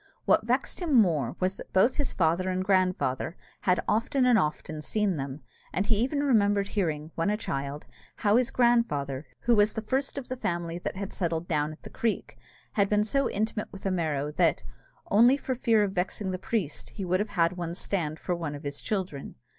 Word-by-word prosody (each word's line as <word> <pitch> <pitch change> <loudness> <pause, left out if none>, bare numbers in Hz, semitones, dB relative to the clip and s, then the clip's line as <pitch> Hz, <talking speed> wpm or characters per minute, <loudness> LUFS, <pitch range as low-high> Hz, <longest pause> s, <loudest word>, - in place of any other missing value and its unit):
What - - +3
vexed - - 0
him 335 -6 0
more 175 - +3
was 185 +1 0
that - - -10
both 210 +7 +4
his 285 -3 0
father 170 +2 +1
and 185 0 -1
grandfather 185 -6 +1 0.3
had 180 - +4
often 240 +4 +2
and 245 -3 +5
often 155 0 -2
seen 205 +1 0
them; 135 +1 -5 0.3
and 195 - 0
he 215 0 +2
even 275 +6 0
remembered 205 -6 +3
hearing, 160 -6 -1
when 165 +4 0
a 210 - +1
child, 140 -7 -4 0.3
how 210 -1 +2
his 250 -1 +2
grandfather, 155 - +1
who 240 0 +3
was 210 0 +3
the 220 - -2
first 270 +6 -1
of 275 - -5
the 255 - -3
family 170 -7 -2
that - - -4
had 195 0 -5
settled 170 -2 -2
down 150 -2 0
at 155 - -13
the - - -9
creek, 230 -2 -2 0.4
had 200 -2 +2
been 210 0 +3
so 275 +5 +1
intimate 215 +1 -2
with 195 - -11
a 195 - +1
Merrow 150 -5 -1
that, 165 -1 +2 0.5
only 240 +6 +6
for 265 - -2
fear 230 -4 +3
of 195 -2 -1
vexing 190 +1 -2
the 185 - -3
priest, 190 -6 -3
he 195 - -4
would 185 +1 +1
have 210 +1 -1
had 170 +1 +3
him 170 -1 -4
stand 165 -5 -2
for 180 - -2
one 165 -4 -3
of 145 - -9
his 145 0 -4
children. 185 -9 -3
190 Hz, 210 wpm, -28 LUFS, 165-220 Hz, 0.5 s, only